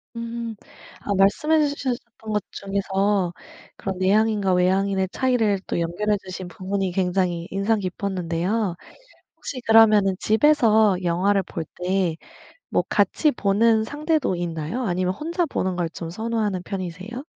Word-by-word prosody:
음 230 Hz, -1 st, -5 dB, 0.5 s
아 200 Hz, -, -2 dB
말씀해 295 Hz, +11 st, +3 dB
주셔 280 Hz, -3 st, -2 dB
셨던 230 Hz, -3 st, -9 dB
것 210 Hz, -2 st, 0 dB
중에서 195 Hz, -1 st, 0 dB, 0.5 s
그런 190 Hz, -1 st, -4 dB
내향인과 205 Hz, 0 st, +2 dB
외향인의 190 Hz, +1 st, +2 dB
차이를 225 Hz, -6 st, +1 dB
또 -, -, -1 dB
연결해 205 Hz, +5 st, 0 dB
주신 185 Hz, -1 st, -6 dB
부분이 190 Hz, +1 st, -3 dB
굉장히 180 Hz, -2 st, 0 dB
인상 200 Hz, +3 st, +1 dB
깊었는데요. 185 Hz, +1 st, -2 dB, 0.6 s
혹시 255 Hz, -, -6 dB
그러면은 215 Hz, -4 st, +6 dB
집에서 220 Hz, -5 st, +4 dB
영화를 190 Hz, +3 st, +2 dB
볼 165 Hz, -, -6 dB, 0.2 s
때 180 Hz, -3 st, +1 dB, 0.6 s
뭐 -, -, +2 dB
같이 305 Hz, -, +2 dB
보는 220 Hz, 0 st, +2 dB
상대도 300 Hz, -, 0 dB
있나요? 170 Hz, +6 st, -3 dB
아니면 185 Hz, -1 st, 0 dB
혼자 335 Hz, -, -1 dB
보는 185 Hz, -9 st, -2 dB
걸 170 Hz, -2 st, -1 dB
좀 165 Hz, -1 st, -7 dB
선호하는 220 Hz, -2 st, -2 dB
편이세요? 190 Hz, -, -6 dB
200 Hz, 300 characters per minute, -23 LUFS, 185-225 Hz, 0.6 s, 그러면은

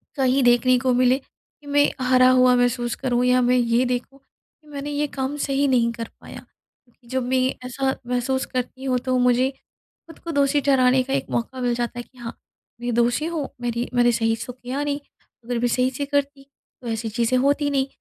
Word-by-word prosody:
कहीं 265 Hz, -1 st, +2 dB
देखने 245 Hz, +1 st, +4 dB
को 255 Hz, 0 st, +1 dB
मिले 255 Hz, +1 st, +3 dB
कि 290 Hz, +1 st, -24 dB
मैं 290 Hz, 0 st, +3 dB
हारा 255 Hz, 0 st, +5 dB
हुआ 255 Hz, -1 st, +5 dB
महसूस 245 Hz, -1 st, 0 dB
करूँ 250 Hz, -2 st, 0 dB
या 250 Hz, 0 st, +4 dB
मैं 250 Hz, +1 st, +3 dB
ये 235 Hz, 0 st, +2 dB
देखूँ 250 Hz, +2 st, -3 dB
कि 300 Hz, +2 st, -33 dB
मैंने 290 Hz, 0 st, -6 dB
ये 295 Hz, +1 st, -1 dB
काम 265 Hz, +2 st, -2 dB
सही 275 Hz, +1 st, +1 dB
नहीं 240 Hz, -3 st, +2 dB
कर 230 Hz, -1 st, -6 dB
पाया। -, -, -10 dB
क्योंकि 240 Hz, -1 st, -27 dB
जब 260 Hz, +1 st, -2 dB
मैं 260 Hz, 0 st, +2 dB, 0.3 s
ऐसा 265 Hz, +1 st, -1 dB
महसूस 250 Hz, +2 st, -1 dB
करती 255 Hz, +1 st, -5 dB
हूँ 255 Hz, -2 st, 0 dB
तो 255 Hz, 0 st, +1 dB
मुझे 250 Hz, +1 st, +3 dB, 0.6 s
खुद 325 Hz, -, -14 dB
को 335 Hz, -, -6 dB
दोषी 285 Hz, 0 st, +2 dB
ठहराने 260 Hz, -2 st, +3 dB
का 270 Hz, +1 st, -4 dB
एक -, -, -2 dB
मौका 255 Hz, +2 st, -3 dB
मिल 245 Hz, -1 st, +1 dB
जाता 240 Hz, 0 st, -3 dB
है -, -, -5 dB
कि 255 Hz, -, -27 dB
हाँ, 235 Hz, -1 st, -8 dB, 0.4 s
मैं 240 Hz, -1 st, -2 dB
दोषी 240 Hz, +5 st, +1 dB
हूँ 320 Hz, -4 st, -3 dB
मेरी 240 Hz, 0 st, -2 dB
मैंने 240 Hz, -1 st, +4 dB
सही 225 Hz, -1 st, +1 dB
से -, -, -7 dB
तो 250 Hz, -, -6 dB
किया 255 Hz, +3 st, -4 dB
नहीं 290 Hz, 0 st, -2 dB, 0.5 s
अगर 245 Hz, 0 st, -2 dB
मैं 245 Hz, -, +1 dB
सही 250 Hz, +2 st, +1 dB
से 280 Hz, +2 st, -4 dB
करती 280 Hz, -1 st, -2 dB, 0.4 s
तो 240 Hz, -, -8 dB
ऐसी 225 Hz, 0 st, -3 dB
चीज़ें 235 Hz, +3 st, +1 dB
होती 285 Hz, +2 st, +1 dB
नहीं। 270 Hz, -1 st, +1 dB
255 Hz, 210 wpm, -23 LUFS, 245-275 Hz, 0.6 s, हारा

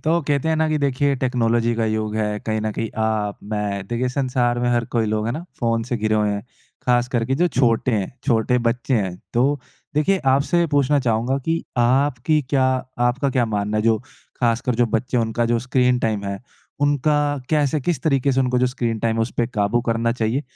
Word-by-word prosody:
तो 165 Hz, +2 st, +2 dB
कहते 145 Hz, +1 st, +1 dB
हैं 160 Hz, -, +2 dB
ना 160 Hz, 0 st, +1 dB
कि 155 Hz, -1 st, +1 dB
देखिए, 140 Hz, 0 st, +1 dB
टेक्नोलॉजी 120 Hz, -2 st, +1 dB
का 115 Hz, 0 st, 0 dB
युग 110 Hz, -1 st, -1 dB
है। 105 Hz, -1 st, -1 dB
कहीं 110 Hz, -1 st, 0 dB
न 110 Hz, -, 0 dB
कहीं 115 Hz, -, -3 dB
आप, 110 Hz, -2 st, -1 dB
मैं, 100 Hz, -2 st, -3 dB
देखिए 120 Hz, +2 st, -1 dB
संसार 125 Hz, -2 st, 0 dB
में 120 Hz, 0 st, 0 dB
हर 120 Hz, -1 st, +1 dB
कोई 115 Hz, -2 st, +2 dB
लोग 110 Hz, 0 st, -1 dB
है 115 Hz, -, -1 dB
ना 160 Hz, +7 st, -5 dB, 0.2 s
फ़ोन 115 Hz, -2 st, +1 dB
से 120 Hz, -, +1 dB
घिरे 110 Hz, 0 st, 0 dB
हुए 105 Hz, -1 st, +2 dB
है। 100 Hz, 0 st, -2 dB, 0.5 s
खास 125 Hz, 0 st, +3 dB
करके 125 Hz, +1 st, 0 dB
जो 175 Hz, +5 st, +2 dB
छोटे 125 Hz, -3 st, +2 dB
है, 100 Hz, -4 st, 0 dB, 0.2 s
छोटे 125 Hz, -1 st, +2 dB
बच्चे 125 Hz, +3 st, -1 dB
हैं। 95 Hz, -5 st, -1 dB, 0.2 s
तो 135 Hz, +3 st, +2 dB, 0.3 s
देखिए 190 Hz, +6 st, +2 dB, 0.2 s
आपसे 170 Hz, +5 st, +2 dB
पूछना 145 Hz, -1 st, +2 dB
चाहूँगा 120 Hz, +2 st, 0 dB
कि 165 Hz, 0 st, 0 dB, 0.2 s
आपकी 135 Hz, +4 st, +2 dB
क्या 135 Hz, -2 st, +3 dB, 0.3 s
आपका 120 Hz, +3 st, +1 dB
क्या 125 Hz, -2 st, +2 dB
मानना 105 Hz, 0 st, -1 dB
है 105 Hz, -, +1 dB
जो 110 Hz, 0 st, +3 dB, 0.4 s
खासकर 120 Hz, +1 st, +1 dB
जो 120 Hz, +1 st, +2 dB
बच्चे 125 Hz, +3 st, -2 dB
है -, -, +3 dB
उनका 115 Hz, +1 st, -1 dB
जो 120 Hz, 0 st, +1 dB
स्क्रीन 125 Hz, 0 st, +2 dB
टाइम 110 Hz, -4 st, -1 dB
है, 100 Hz, 0 st, -3 dB, 0.4 s
उनका 145 Hz, +1 st, +2 dB, 0.4 s
कैसे 150 Hz, -1 st, +2 dB
किस 150 Hz, -1 st, -1 dB
तरीके 140 Hz, -3 st, +2 dB
से 130 Hz, -, +2 dB
उनको 125 Hz, -1 st, +1 dB
जो 125 Hz, -, +3 dB
स्क्रीन 120 Hz, -3 st, -2 dB
टाइम 115 Hz, +1 st, 0 dB
है 115 Hz, -, +2 dB
उस 115 Hz, -, -2 dB
पे 120 Hz, -, +2 dB
काबू 105 Hz, +2 st, 0 dB
करना 115 Hz, 0 st, +1 dB
चाहिए? 120 Hz, +3 st, -1 dB
120 Hz, 215 wpm, -21 LUFS, 110-135 Hz, 0.5 s, खास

